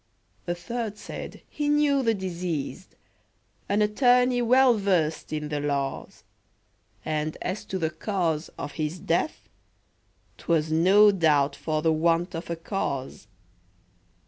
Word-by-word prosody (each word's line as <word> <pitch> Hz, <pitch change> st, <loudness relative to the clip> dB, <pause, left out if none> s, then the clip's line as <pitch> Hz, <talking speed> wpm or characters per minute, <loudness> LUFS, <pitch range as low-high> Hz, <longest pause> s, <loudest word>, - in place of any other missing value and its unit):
A 175 Hz, -, -1 dB
third 215 Hz, +4 st, -5 dB
said, -, -, -8 dB
"He 295 Hz, -1 st, -2 dB
knew 295 Hz, -2 st, +3 dB
the 225 Hz, -3 st, +2 dB
deceased, 175 Hz, -6 st, -4 dB, 0.7 s
An 205 Hz, +1 st, +3 dB
attorney 245 Hz, +3 st, +3 dB
well 250 Hz, +1 st, +5 dB
versed 180 Hz, -7 st, 0 dB
in 150 Hz, -1 st, -3 dB
the 150 Hz, -1 st, -2 dB
laws, 140 Hz, -2 st, -3 dB, 0.8 s
And 155 Hz, 0 st, -2 dB
as 185 Hz, +3 st, -4 dB
to 190 Hz, -, -3 dB
the 160 Hz, -3 st, -1 dB
cause 170 Hz, -7 st, -2 dB
of -, -, -5 dB
his 155 Hz, +3 st, -2 dB
death, 170 Hz, -, -1 dB, 0.9 s
'Twas 160 Hz, -2 st, 0 dB
no 195 Hz, +6 st, +6 dB
doubt 150 Hz, -6 st, +2 dB
for 155 Hz, -1 st, -2 dB
the 160 Hz, -1 st, +3 dB
want 165 Hz, +3 st, +1 dB
of 165 Hz, +1 st, -6 dB
a 170 Hz, -, -1 dB
cause." 165 Hz, -6 st, -4 dB
175 Hz, 130 wpm, -26 LUFS, 155-210 Hz, 0.9 s, no